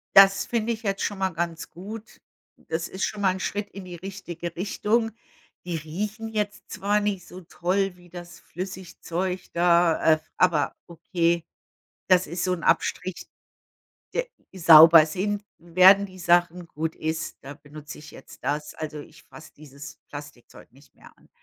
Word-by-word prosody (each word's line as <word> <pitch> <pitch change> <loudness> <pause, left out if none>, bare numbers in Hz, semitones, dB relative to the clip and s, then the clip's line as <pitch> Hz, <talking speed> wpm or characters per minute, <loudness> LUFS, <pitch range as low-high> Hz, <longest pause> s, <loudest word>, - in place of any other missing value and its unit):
Das 195 0 +7
finde 235 -1 -1
ich 225 +1 -9
jetzt 195 -1 -1
schon 205 -2 -3
mal 190 -1 +1
ganz 170 -2 -4
gut, 210 +6 -10 0.5
das 165 +1 -2
ist 190 - -2
schon 210 -1 -5
mal 190 - +3
'n 190 - -6
Schritt 205 +2 -3
in 195 -2 -10
die 175 -1 -8
richtige 175 -2 -7
Richtung. 215 +4 0 0.5
Die 175 -1 -3
riechen 205 +8 -4
jetzt 210 -2 -4
zwar 205 +2 +1
nicht 200 -3 -2
so 185 +1 -10
toll 185 +2 -1
wie 175 -1 -19
das 175 0 -10
Flüssigzeug 185 0 -5
da, 170 -2 +4
äh, - - -10 0.2
aber 165 -6 +2
okay, 170 0 -1 0.6
das 185 -1 +4
ist 175 +3 -3
so 185 - +1
'n 170 - -8
Abstrich 185 -1 0 0.9
de - - 0 0.3
sauber 165 -2 +9
sind 200 +6 -3
werden 185 +4 +6
die 185 -1 -15
Sachen, 175 0 +2
gut 160 +1 -4
ist, 160 0 -4
da 135 - -8
benutze 150 +1 -11
ich 150 - -12
jetzt - - -14
das. 150 +1 -2
Also, 155 -1 -6
ich 145 0 -15
fasse 155 - -14
dieses 140 -1 -11
Plastikzeug 145 -6 -12
nicht 140 +2 -22
mehr - - -17
an, - - -25
175 Hz, 160 wpm, -25 LUFS, 160-195 Hz, 0.9 s, sauber